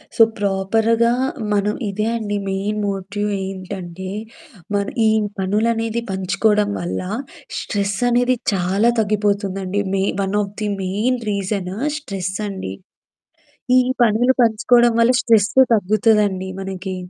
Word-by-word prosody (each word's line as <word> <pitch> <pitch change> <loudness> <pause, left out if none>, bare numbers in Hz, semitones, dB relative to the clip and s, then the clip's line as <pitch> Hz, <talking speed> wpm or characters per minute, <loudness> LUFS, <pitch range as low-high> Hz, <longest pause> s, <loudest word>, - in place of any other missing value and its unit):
So, 230 - +7
ప్రాపర్‌గా 220 +4 +2 0.4
మనం 205 +1 +1
ఇదే 210 +2 -2
అండి 205 -2 -2
మెయిన్ 200 +2 -2
మోట్యు 200 +1 -3 0.2
ఏంటంటే, 185 -1 -6 0.7
మన 200 0 +1 0.2
ఈ - - +5 0.3
పనులనేది 225 +4 0
పంచుకోవడం 205 +2 +1
వల్ల 175 - -3 0.6
స్ట్రెస్ 200 -1 -2
అనేది 245 +1 +3 0.2
చాలా 195 +5 +2
తగ్గిపోతుందండి. 200 -2 0
మెయి 195 0 +1
one 195 +1 -1
of 200 0 -5
the 210 - 0 0.2
main 220 +7 0
reason 195 -1 -3 0.2
స్ట్రెసండి. 190 - -4 1.1
ఈ - - +7 0.2
పనులు 235 +3 +4
పంచుకోవడం 235 +1 +4
వల్ల 235 +2 +5
స్ట్రెస్సు 225 +3 +4
తగ్గుతదండి 205 -2 +2
మనకి. 190 0 -5
205 Hz, 110 wpm, -20 LUFS, 190-220 Hz, 1.1 s, So